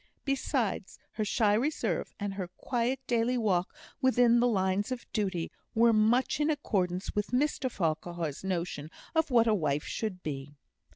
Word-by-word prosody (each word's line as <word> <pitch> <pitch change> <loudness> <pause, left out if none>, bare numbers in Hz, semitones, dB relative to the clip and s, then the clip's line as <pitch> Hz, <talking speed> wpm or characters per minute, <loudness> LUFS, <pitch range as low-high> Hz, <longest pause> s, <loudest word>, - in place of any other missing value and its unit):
Besides, 260 -7 -1
her 215 - -2
shy 210 0 +2
reserve, 230 - -1
and 200 -1 -2
her 190 -2 -4
quiet 245 +1 -1
daily 240 +1 +1
walk 185 -6 +1 0.3
within 245 -2 +5
the 245 - +4
lines 195 0 +1
of 255 -1 -4
duty, 190 -6 -1 0.2
were 230 +1 +5
much 225 +6 +3
in 300 +1 +2
accordance 190 - -1
with 210 0 0
Mr 265 0 0
Farquhar's 165 - -2
notion 170 -5 -3 0.2
of 320 -1 +2
what 235 -3 +5
a 225 - +3
wife 150 -6 0
should 195 -5 -4
be. 145 -1 -5
215 Hz, 155 wpm, -30 LUFS, 180-245 Hz, 0.3 s, within